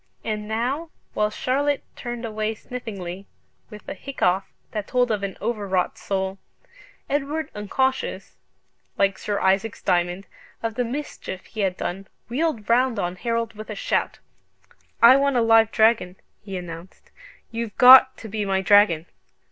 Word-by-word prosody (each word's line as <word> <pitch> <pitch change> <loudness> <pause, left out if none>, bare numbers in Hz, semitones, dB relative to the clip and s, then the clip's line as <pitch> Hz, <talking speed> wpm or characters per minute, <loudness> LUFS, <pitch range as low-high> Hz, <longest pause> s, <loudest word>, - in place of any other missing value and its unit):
And 210 -1 -3
now, 250 +9 -2 0.2
while 210 0 +1
Charlotte 280 +5 0
turned 240 -1 -5
away 215 0 -2
sniffingly, 200 -6 -7 0.4
with 210 -2 -12
a - - -4
hiccough 190 -5 -1 0.2
that 210 -2 -4
told 245 -2 +1
of 210 -2 0
an 195 -2 -4
overwrought 200 -5 -1
soul, 190 0 -3 0.7
Edward, 295 +2 -2
unconscious 260 +6 -2 0.6
(like 195 -1 +2
Sir 205 -1 -2
Isaac's 195 +3 0
Diamond) 175 +1 0 0.4
of 225 -1 -1
the 245 - -1
mischief 240 -7 -6
he 220 - -10
had 190 -2 0
done, 190 +2 -4 0.2
wheeled 255 -4 -1
round 245 0 +3
on 180 -2 -2
Harold 230 +3 -2
with 215 0 -10
a - - -4
shout. - - -1 0.9
"I 250 +3 +9
want 280 -1 +1
a - - +4
live 225 -1 +5
dragon," 220 -5 +3 0.3
he 195 -2 -6
announced: 175 0 -10 0.4
"you've 230 -2 -5
got 260 +1 +9
to 225 - -9
be 215 0 -3
my 195 -1 0
dragon!" 195 -5 +5
215 Hz, 150 wpm, -23 LUFS, 195-245 Hz, 0.9 s, I